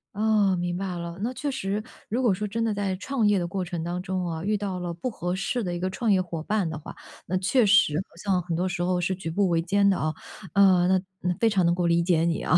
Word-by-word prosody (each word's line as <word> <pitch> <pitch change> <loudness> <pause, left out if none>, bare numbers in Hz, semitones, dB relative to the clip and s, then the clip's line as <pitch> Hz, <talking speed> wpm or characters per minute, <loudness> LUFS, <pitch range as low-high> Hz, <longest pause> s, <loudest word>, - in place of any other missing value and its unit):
哦， 210 -3 +3
明 175 0 -2
白 185 -1 -3
了， 170 +1 -6
那 240 +3 -1
确 280 +3 -2
实 205 -4 -2 0.3
如 240 +5 0
果 225 - +4
说 210 +3 -3
真 225 +3 -2
的 225 -2 +1
在 200 -2 -1
创 230 +3 0
业 205 -1 +4
的 175 - -1
过 190 +1 -3
程 175 -2 -4
当 175 +2 -3
中 185 -1 -2
啊， 165 0 -4
遇 210 +1 +1
到 195 -3 -3
了 175 -1 -3
不 170 +9 -5
合 180 -4 -3
适 195 +6 -1
的 175 -2 -2
一 175 - -4
个 185 - -1
创 220 +3 0
业 190 - +4
伙 170 -3 -3
伴 205 +1 0
的 155 -1 -5
话， - - -10 0.3
那 185 +2 0
确 235 +7 +3
实 210 -6 +5 0.2
好 - - -23
像 190 -3 +1
很 170 -1 -3
多 180 +3 0
时 175 -1 -3
候 180 0 +1
是 180 +2 0
举 180 -3 -5
步 195 +4 +1
维 165 -1 +2
艰 200 +4 +2
的 195 - +3
啊。 155 0 -1 0.4
呃， 185 -3 +5
那 190 0 +4 0.2
那 180 - 0
非 230 - +4
常 195 -4 +2
能 170 - +3
够 175 -1 0
理 170 0 +3
解 170 -2 +2
你 170 -1 0
啊。 180 - +4
185 Hz, 300 characters per minute, -26 LUFS, 175-205 Hz, 0.4 s, 实